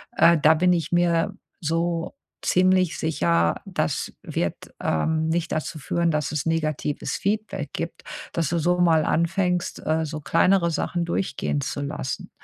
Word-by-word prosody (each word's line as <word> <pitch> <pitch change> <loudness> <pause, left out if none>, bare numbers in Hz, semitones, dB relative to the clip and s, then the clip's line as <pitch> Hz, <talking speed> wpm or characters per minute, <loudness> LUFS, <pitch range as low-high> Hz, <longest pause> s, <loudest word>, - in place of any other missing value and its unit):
äh, 170 - +6
da 155 +1 +7
bin 180 +3 +3
ich 170 -2 -1
mir 175 -1 +2 0.3
so 165 +1 -1 0.3
ziemlich 185 -2 +3
sicher, 85 - +1
das - - -2
wird, - - -2 0.3
ähm, 160 - 0
nicht 165 +1 -1
dazu 155 0 -3
führen, 170 +4 0
dass 150 -2 -1
es 150 -2 -2
negatives 155 -3 -1
Feedback 215 +2 -2
gibt.“ - - -5 0.3
Dass 165 -4 0
du 170 - 0
so 175 +3 +1
mal 165 -3 +4
anfängst, 180 +1 0
äh, 160 +1 +1
so 155 0 -5
kleinere 170 +4 +3
Sachen 170 +2 -1
durchgehen 160 -4 -1
zu 140 - -3
lassen. 140 -2 -4
165 Hz, 150 wpm, -24 LUFS, 155-175 Hz, 0.3 s, da